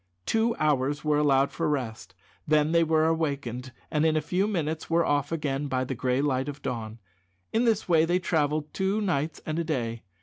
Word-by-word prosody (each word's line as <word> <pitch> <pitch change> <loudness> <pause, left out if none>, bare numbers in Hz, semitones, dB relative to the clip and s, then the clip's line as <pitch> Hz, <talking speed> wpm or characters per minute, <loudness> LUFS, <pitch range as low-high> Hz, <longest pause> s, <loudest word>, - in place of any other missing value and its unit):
Two 225 +1 +1
hours 145 -1 +1
were 150 -1 +3
allowed 140 -2 +3
for - - -1
rest; 125 -7 -3 0.3
then 155 0 +3
they 170 0 +4
were 160 -1 +2
awakened, 140 -6 -2 0.2
and 150 0 +1
in 160 -1 +3
a - - +3
few 180 +6 0
minutes 160 -6 -2
were 170 0 +3
off 145 0 0
again 145 -3 -2
by 130 -2 0
the 130 - -3
gray 130 +2 0
light 135 -1 0
of 145 0 -8
dawn. 115 -2 -4 0.6
In 230 +2 +2
this 225 -3 +1
way 165 -3 +4
they 175 +2 +2
travelled 155 -4 0
two 195 +2 0
nights 165 -7 -1
and 155 +1 -2
a - - 0
day. 120 -8 -2
150 Hz, 200 wpm, -27 LUFS, 135-165 Hz, 0.6 s, they